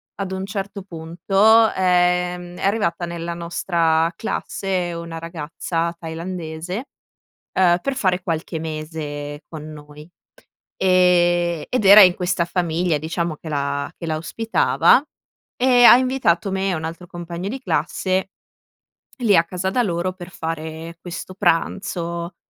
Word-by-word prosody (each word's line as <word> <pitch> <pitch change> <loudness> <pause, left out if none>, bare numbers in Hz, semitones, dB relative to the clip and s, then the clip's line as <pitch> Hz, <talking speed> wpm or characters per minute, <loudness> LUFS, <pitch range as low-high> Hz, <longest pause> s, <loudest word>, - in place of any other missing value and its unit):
ad 195 -1 -4
un 190 0 -3
certo 200 0 -5
punto, 195 +6 +3
ehm, 180 -1 +1
è - - -7
arrivata 195 -4 0
nella 170 0 -5
nostra 170 -1 0
classe 190 -3 -3
una 170 -1 -6
ragazza 165 +1 -3
tailandese, 170 +4 -5 0.7
uhm, 175 -2 +4
per 275 - -1
fare 185 -7 0
qualche 165 0 -3
mese 155 -2 -6
con 155 -2 -8
noi, 150 +1 -12 0.7
ehm, 175 -2 +3
ed 250 -5 0
era 200 +2 +10
in 180 -2 +7
questa 180 -1 0
famiglia, 170 -1 0
diciamo, 160 +2 -3
che 160 - -12
la 140 -1 -2
che - - -7
la 155 -1 -1
ospitava 225 +9 +2 0.6
e 250 -1 +4
ha 240 - +10
invitato 255 -9 +1
me 190 +1 0
e - - 0
un 160 0 -4
altro 165 +2 -7
compagno 175 0 -6
di 265 +5 -5
classe 190 -6 -1 0.9
lì 220 -5 +4
a 165 - +5
casa 180 +2 -3
da 250 - +2
loro 180 -2 -1
per 180 -1 -10
fare 160 0 -6
questo 180 +1 -7
pranzo, 170 -1 -1
175 Hz, 135 wpm, -21 LUFS, 165-190 Hz, 0.9 s, era